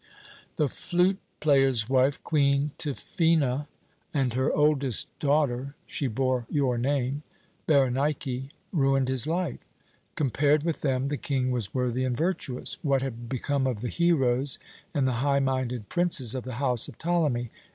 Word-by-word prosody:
"The 150 - +2
flute 180 +7 0 0.2
player's 135 -6 +3
wife, 135 +1 +2
Queen 140 -1 +2
Tryphœna, 150 -2 +1 0.5
and 130 -4 +1
her 130 +2 +1
oldest 145 -3 +1
daughter 140 -2 0
she 140 - -2
bore 130 0 -1
your 130 -5 +1
name, 135 +2 0 0.5
Berenike 135 -1 +1 0.2
ruined 135 -5 +2
his 130 +1 +2
life. 170 -3 -1 0.6
Compared 145 +1 +2
with 165 -1 -2
them, 135 -1 0
the 145 - -2
King 130 -3 -1
was 120 -3 -2
worthy 125 0 0
and 125 -2 -1
virtuous. 155 -6 -2
What 135 -3 +1
had 120 -3 -5
become 135 +1 -1
of 120 -5 -2
the 120 - -2
heroes 140 -6 +2 0.3
and 135 -3 +1
the - - +1
high 140 0 +2
minded 130 -4 -1
princes 170 -10 +3
of 130 -2 -4
the 130 -2 -5
house 125 -3 +2
of - - -11
Ptolemy? 150 -9 0
135 Hz, 145 wpm, -27 LUFS, 125-150 Hz, 0.6 s, player's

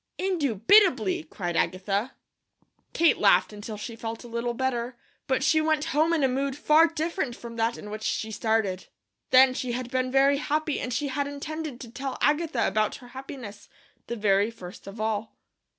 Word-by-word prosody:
"Indubitably!" 310 - +3
cried 175 +2 -4
Agatha. 195 +8 -1 0.8
Kate 335 0 +3
laughed - - +4
until 210 +1 -7
she 230 +2 -6
felt 225 0 -6
a - - -10
little 235 +1 -3
better, 245 -1 -2 0.3
but 260 0 +1
she 315 +2 +4
went 310 -1 +1
home 310 +3 +3
in 325 -4 +2
a - - +5
mood 270 +1 -1
far 310 +3 +5
different 320 -5 -2
from 235 -1 -9
that 230 +1 0
in 210 - -9
which 215 0 -6
she 220 0 -2
started. 220 -4 -1 0.4
Then 260 0 +7
she 255 -2 -3
had 250 0 -4
been 255 0 0
very 275 +1 +4
happy, 305 +1 -1
and 250 - -4
she 275 +4 -1
had 280 +2 -1
intended 295 -1 -6
to 235 -3 -9
tell 265 +1 -5
Agatha 310 +3 +1
about 215 -1 +1
her 245 -2 -13
happiness, 250 -6 -9 0.4
the 235 - -3
very 205 -1 +2
first 185 -5 -11
of 195 +3 -9
all. 220 0 -2
250 Hz, 180 wpm, -26 LUFS, 220-285 Hz, 0.8 s, Then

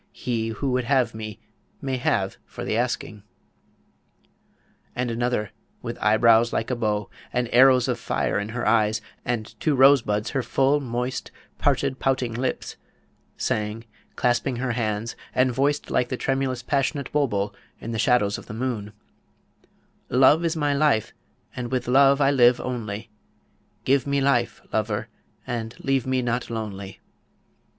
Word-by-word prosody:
He 115 -3 -2
who 120 +5 -2
would 125 -1 0
have 125 -3 +2
me, 110 -2 -7 0.4
may 135 -1 -2
have 95 -5 0
for - - -8
the - - -1
asking. 120 -3 -2 1.7
And 125 -1 -1
another, 115 -3 -1 0.3
with - - -5
eyebrows 115 +2 +5
like 115 - -1
a - - +1
bow, 105 -3 -1 0.2
and 125 -1 0
arrows 130 0 +6
of - - -1
fire - - -1
in 105 +1 -4
her 120 +1 -3
eyes, 110 -1 +3 0.2
and 120 -2 -3
two 155 -3 +1
rosebuds 130 -6 +4
her 135 - 0
full 135 +3 +2
moist 125 0 -3 0.3
parted 130 - +1
pouting 130 -3 0
lips, 125 +3 -3 0.6
sang, 105 +1 -2 0.3
clasping 125 +1 +1
her 125 +1 -2
hands, 115 -1 -2 0.2
and 130 0 +3
voiced 140 +4 0
like 125 - +1
the 130 - -2
tremulous 135 -2 -1
passionate 140 +1 -1
bulbul 105 -9 0 0.3
in 115 - -6
the 110 - -3
shadows 115 -4 +2
of - - -14
the 105 - -7
moon: 110 -4 -3 1.2
Love 135 +6 +5
is 165 0 0
my 145 -2 +1
life, 140 -7 +2 0.4
and 120 -1 -5
with 130 -2 -1
love 135 +2 +5
I 140 -1 +4
live 125 -3 +5
only; 110 -3 -5 0.7
Give 135 +1 +2
me 140 0 +1
life, 120 -5 +1
lover, 110 -1 -1 0.4
and 115 -2 -4
leave 135 -2 0
me 130 -1 +1
not 120 0 -1
lonely. 100 -4 -6
120 Hz, 150 wpm, -24 LUFS, 110-135 Hz, 1.7 s, arrows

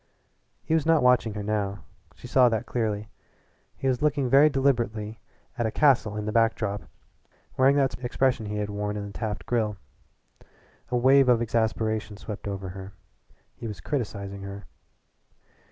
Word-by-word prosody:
He - - -1
was 160 -2 +3
not 165 -4 +4
watching 125 -4 +3
her 105 - -4
now. 100 -1 -2 0.3
She - - -14
saw 125 0 +5
that 115 +1 -1
clearly. 110 -4 -2 0.7
He 135 - -2
was 130 0 +1
looking 145 -3 +1
very 140 +3 +7
deliberately 120 -6 0 0.4
at 120 - +1
a - - -2
castle 130 -7 +3
on 105 0 -4
the 110 - -2
back 115 0 +3
drop, 105 -2 -3 0.7
wearing 135 +2 +4
that 130 -4 0
expression 120 -2 0
he 105 0 -3
had 105 0 -2
worn 105 0 -3
in 100 - -4
the 100 - -9
Taft 105 -2 -4
Grill. 110 -4 0 1.1
A 125 - +1
wave 135 +1 +5
of 120 -2 +5
exasperation 110 -2 -1
swept 105 -1 -7
over 95 -1 -4
her 95 +1 -9 0.6
he 115 - -7
was 105 -5 -6
criticising 100 - -4
her. 100 0 -8
110 Hz, 165 wpm, -26 LUFS, 105-125 Hz, 1.1 s, very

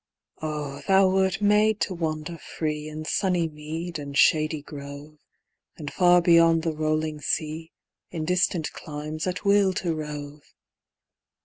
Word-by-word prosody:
Oh, 150 -3 -4
thou 195 -1 +5
wert 190 +1 +1
made 210 +1 +4
to 190 - 0
wander 160 -1 -4
free 150 -1 -4
In 155 0 -7
sunny 180 -1 +1
mead 160 +2 -6
and 140 -1 -5
shady 155 -1 +3
grove, 145 +1 -10 0.6
And 145 -2 -7
far 180 -1 +5
beyond 165 -1 +5
the 165 -1 -1
rolling 155 0 -1
sea, 160 +2 -2 0.4
In 160 -3 -4
distant 180 -2 +1
climes, 155 +2 -6
at 180 +3 -4
will 200 -1 +4
to 175 -2 -1
rove! 150 -1 -6
155 Hz, 135 wpm, -25 LUFS, 150-180 Hz, 0.6 s, thou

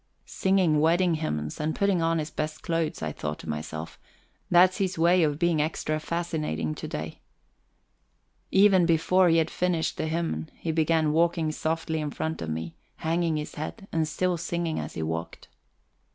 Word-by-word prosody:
Singing 185 -5 +2
wedding 170 +3 +3
hymns, 75 - -3
and 155 +1 -1
putting 200 -3 +2
on 165 0 +2
his 155 -1 -3
best 155 0 -4
clothes, 165 - -1
I 80 - -1
thought 75 0 -4
to - - -11
myself 80 +1 -5 0.5
that's 180 +1 +5
his 190 -3 -1
way 175 +2 +4
of 150 -3 +2
being 170 -2 +2
extra 155 0 -1
fascinating 155 - -2
to - - -6
day. - - -6 1.3
Even 190 -3 +5
before 175 +2 +4
he 165 - +4
had 160 0 +1
finished 175 -3 0
the - - -1
hymn 155 - -2
he 165 - -3
began 160 -1 +2
walking 165 -1 +2
softly 160 +1 -2
in 150 - -2
front 160 +2 -4
of 80 - -4
me, 80 +1 -4 0.2
hanging 165 0 0
his 150 - -5
head, 195 +7 -6
and 160 -1 +1
still 180 +3 0
singing 170 0 -2
as - - -6
he 80 - -2
walked. 80 +1 -5
160 Hz, 170 wpm, -27 LUFS, 150-170 Hz, 1.3 s, that's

